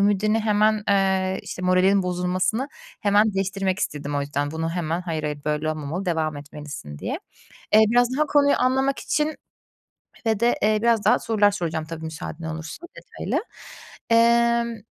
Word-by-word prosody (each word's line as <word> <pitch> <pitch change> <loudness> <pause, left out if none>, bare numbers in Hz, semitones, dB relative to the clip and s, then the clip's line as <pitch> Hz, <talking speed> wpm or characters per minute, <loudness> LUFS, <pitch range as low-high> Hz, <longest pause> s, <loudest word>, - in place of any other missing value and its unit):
ümidini 205 +2 +2
hemen 215 0 +2
eee, 190 -1 +2
işte 180 - -7
moralinin 185 +2 +3
bozulmasını 180 +8 -1 0.3
hemen 205 0 +3
değiştirmek 195 0 -1
istedim 145 -4 -3
o 145 - 0
yüzden. 145 0 -2
Bunu 160 +1 -3
hemen, 170 -1 -2
"Hayır, 165 -3 -3
hayır, 150 -1 -3
böyle 150 +1 -1
olmamalı, 155 +5 -4
devam 160 -3 -1
etmelisin." 145 - -9
diye. - - -4 0.5
Eee, 215 - +8
biraz 245 +2 +4
daha 305 - +3
konuyu 285 -1 +4
anlamak 265 +2 +1
için 305 +1 -1 0.9
ve 220 -1 +1
de, 240 +1 +3
eee, 215 0 +3
biraz 230 -3 +2
daha - - +5
sorular 210 -2 +2
soracağım 160 -5 -3
tabii, 160 0 -7
müsaaden 160 +1 -7
olursun 160 - -7
detaylı. - - -4 0.7
Emm, 235 0 +3
190 Hz, 155 wpm, -23 LUFS, 160-220 Hz, 0.9 s, Eee